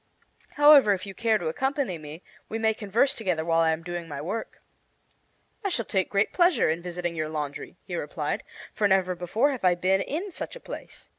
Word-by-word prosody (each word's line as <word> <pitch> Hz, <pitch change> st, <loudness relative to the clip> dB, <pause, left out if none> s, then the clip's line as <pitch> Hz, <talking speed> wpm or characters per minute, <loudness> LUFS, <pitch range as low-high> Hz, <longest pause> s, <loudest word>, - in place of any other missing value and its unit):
However, 290 Hz, -7 st, +7 dB
if 185 Hz, 0 st, -4 dB
you 195 Hz, -, -7 dB
care 225 Hz, 0 st, +2 dB
to 175 Hz, -, -4 dB
accompany 265 Hz, -, -1 dB
me, 155 Hz, +3 st, -10 dB, 0.3 s
we 225 Hz, -, -2 dB
may 220 Hz, 0 st, +2 dB
converse 220 Hz, +6 st, +1 dB
together 180 Hz, -7 st, -2 dB
while 165 Hz, 0 st, +2 dB
I 165 Hz, -, +3 dB
am 160 Hz, +1 st, -1 dB
doing 175 Hz, -1 st, -5 dB
my 145 Hz, -3 st, -6 dB
work." 195 Hz, +10 st, -5 dB, 1.0 s
"I 395 Hz, -, 0 dB
shall 235 Hz, -, -1 dB
take 190 Hz, -2 st, 0 dB
great 200 Hz, +1 st, +1 dB
pleasure 345 Hz, -, +4 dB
in 165 Hz, +2 st, -3 dB
visiting 175 Hz, -1 st, -4 dB
your 155 Hz, -1 st, -2 dB
laundry," 150 Hz, -2 st, -5 dB
he -, -, -5 dB
replied, -, -, -3 dB, 0.3 s
"for 210 Hz, -, +2 dB
never 190 Hz, -2 st, +2 dB
before 180 Hz, +11 st, +1 dB
have 260 Hz, -6 st, -5 dB
I 180 Hz, -1 st, +4 dB
been 190 Hz, +2 st, +2 dB
in 355 Hz, -, -4 dB
such -, -, -6 dB
a -, -, -9 dB
place. -, -, -9 dB
190 Hz, 205 wpm, -26 LUFS, 170-235 Hz, 1.0 s, However